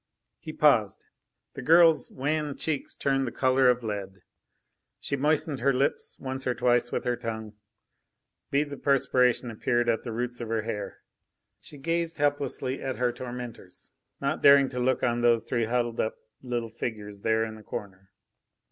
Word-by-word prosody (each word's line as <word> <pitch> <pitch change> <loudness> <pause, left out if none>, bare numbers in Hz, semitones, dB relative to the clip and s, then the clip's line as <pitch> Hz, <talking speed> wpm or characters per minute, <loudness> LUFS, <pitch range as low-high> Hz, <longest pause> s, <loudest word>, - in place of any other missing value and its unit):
He - - -7
paused, - - +2 0.5
the - - -7
girl's 165 -1 +5
wan 150 +1 -2
cheeks 150 -3 -2
turned 135 -1 0
the - - -3
colour 130 +1 +3
of 125 -1 +1
lead. 100 -3 -5 0.8
She 140 - -2
moistened 150 0 0
her 140 +4 +3
lips 135 +2 -1
once 130 0 -4
or 125 - +1
twice 120 0 +2
with - - -2
her 125 0 +1
tongue; 110 -2 -6 1.0
beads 145 +1 0
of 140 - -9
perspiration 125 -3 +2
appeared 120 +2 0
at 115 -1 +1
the 120 - -5
roots 120 +2 -3
of 120 - -4
her 110 -1 -1
hair. 105 -2 -5 0.6
She 145 - -13
gazed 165 +3 -1
helplessly 145 -2 -1
at 135 -1 -3
her 125 -1 +1
tormentors, 120 -6 -9 0.3
not - - -1
daring 140 -1 +7
to 125 - -5
look 130 +1 +1
on 120 -1 +1
those 120 -1 +3
three 115 0 -1
huddled 120 0 -1
up 110 - 0 0.3
little 120 -3 -3
figures 105 -3 -6
there 110 +1 +2
in 110 - -7
the 110 - -12
corner. 95 -2 -8
125 Hz, 165 wpm, -27 LUFS, 115-135 Hz, 1.0 s, daring